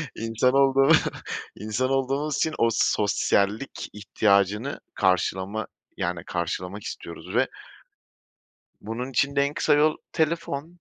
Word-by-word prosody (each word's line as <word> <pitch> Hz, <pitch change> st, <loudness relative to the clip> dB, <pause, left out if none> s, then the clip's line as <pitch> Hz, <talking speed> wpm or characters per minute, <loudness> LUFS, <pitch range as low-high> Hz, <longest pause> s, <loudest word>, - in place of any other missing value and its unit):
İnsan 115 Hz, +3 st, +1 dB
olduğumu 135 Hz, +1 st, +5 dB, 0.6 s
insan 110 Hz, +5 st, -1 dB
olduğumuz 135 Hz, +2 st, 0 dB
için 160 Hz, -, 0 dB
o 115 Hz, -, +4 dB
sosyallik 105 Hz, +1 st, +1 dB
ihtiyacını 105 Hz, +3 st, +1 dB
karşılama 95 Hz, +2 st, 0 dB, 0.3 s
yani 85 Hz, 0 st, -2 dB
karşılamak 90 Hz, +3 st, -3 dB
istiyoruz 85 Hz, -, -7 dB
ve -, -, +3 dB, 1.3 s
bunun 120 Hz, +5 st, -5 dB
için 140 Hz, +3 st, +1 dB
de 140 Hz, -, +4 dB
en 140 Hz, +1 st, -1 dB
kısa -, -, +3 dB
yol 155 Hz, +1 st, +3 dB, 0.2 s
telefon. 160 Hz, -2 st, -1 dB
115 Hz, 110 wpm, -25 LUFS, 100-140 Hz, 1.3 s, olduğumu